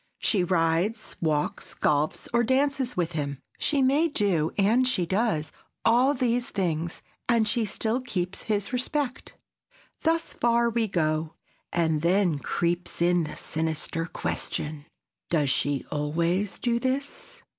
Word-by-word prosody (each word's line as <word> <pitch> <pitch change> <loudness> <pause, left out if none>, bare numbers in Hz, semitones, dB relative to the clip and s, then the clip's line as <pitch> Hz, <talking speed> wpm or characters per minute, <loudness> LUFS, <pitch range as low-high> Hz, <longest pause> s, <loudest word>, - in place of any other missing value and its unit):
She 195 -5 +2
rides, 175 +5 0
walks, 155 -3 -1
golfs 150 +1 0
or 235 0 +4
dances 265 0 +1
with 175 -1 0
him. 140 -4 -3 0.2
She 285 -3 +2
may 285 +6 +4
do, 195 - +1
and 225 +6 +4
she 185 -9 +1
does, 185 -5 0 0.3
all 250 +5 +4
these 245 -1 +1
things, 170 -4 -2 0.3
and 230 -2 +4
she 225 +1 +2
still 220 +4 -1
keeps 185 -7 -2
his 205 +2 0
respect. 255 +1 -2 0.6
Thus 330 0 0
far 235 0 +2
we 230 -1 +1
go, 155 -3 -1 0.4
and 160 -3 +1
then 175 -2 +2
creeps 175 +4 -2
in 175 -1 +3
the 150 - -7
sinister 160 +1 -2
question: 150 -2 -3 0.4
Does 150 -5 +2
she 140 +2 0
always 170 +7 0
do 235 -1 0
this? 265 +3 -3
190 Hz, 135 wpm, -27 LUFS, 160-240 Hz, 0.6 s, or